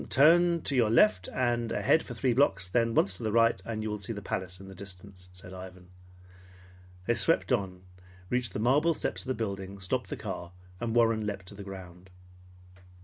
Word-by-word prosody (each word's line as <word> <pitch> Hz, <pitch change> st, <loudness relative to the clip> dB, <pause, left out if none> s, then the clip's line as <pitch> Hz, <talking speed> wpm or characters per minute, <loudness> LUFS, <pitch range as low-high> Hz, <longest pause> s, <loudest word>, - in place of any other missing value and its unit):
"Turn 170 Hz, +4 st, +5 dB
to 140 Hz, -, 0 dB
your 120 Hz, -4 st, +3 dB
left 95 Hz, -5 st, +4 dB
and 120 Hz, -2 st, 0 dB
ahead 160 Hz, -, +3 dB
for 120 Hz, -, -8 dB
three 125 Hz, +1 st, +1 dB
blocks, 95 Hz, -9 st, +2 dB
then 115 Hz, +4 st, +1 dB
once 95 Hz, -1 st, +3 dB
to -, -, -11 dB
the 110 Hz, -, 0 dB
right, 115 Hz, -3 st, +3 dB
and 110 Hz, 0 st, -4 dB
you 110 Hz, -, -2 dB
will 105 Hz, -, -4 dB
see 100 Hz, +4 st, -3 dB
the 100 Hz, -, -7 dB
palace 90 Hz, -2 st, -4 dB
in 95 Hz, -, -11 dB
the 95 Hz, -, -10 dB
distance," 95 Hz, -1 st, -8 dB
said 90 Hz, 0 st, -9 dB
Ivan. 90 Hz, -1 st, -10 dB, 1.2 s
They 120 Hz, -, +2 dB
swept 165 Hz, +5 st, +2 dB
on, 95 Hz, -6 st, -1 dB, 0.4 s
reached 125 Hz, +3 st, -1 dB
the -, -, -3 dB
marble 145 Hz, +8 st, +3 dB
steps -, -, -3 dB
of -, -, -9 dB
the 130 Hz, -, -1 dB
building, 100 Hz, -3 st, -5 dB
stopped 95 Hz, -1 st, -2 dB
the -, -, -4 dB
car, 85 Hz, 0 st, -6 dB, 0.3 s
and 115 Hz, -1 st, -2 dB
Warren 115 Hz, -2 st, +3 dB
leaped 100 Hz, -2 st, -4 dB
to -, -, -10 dB
the 100 Hz, 0 st, -9 dB
ground. 95 Hz, -2 st, -10 dB
105 Hz, 200 wpm, -29 LUFS, 95-120 Hz, 1.2 s, Turn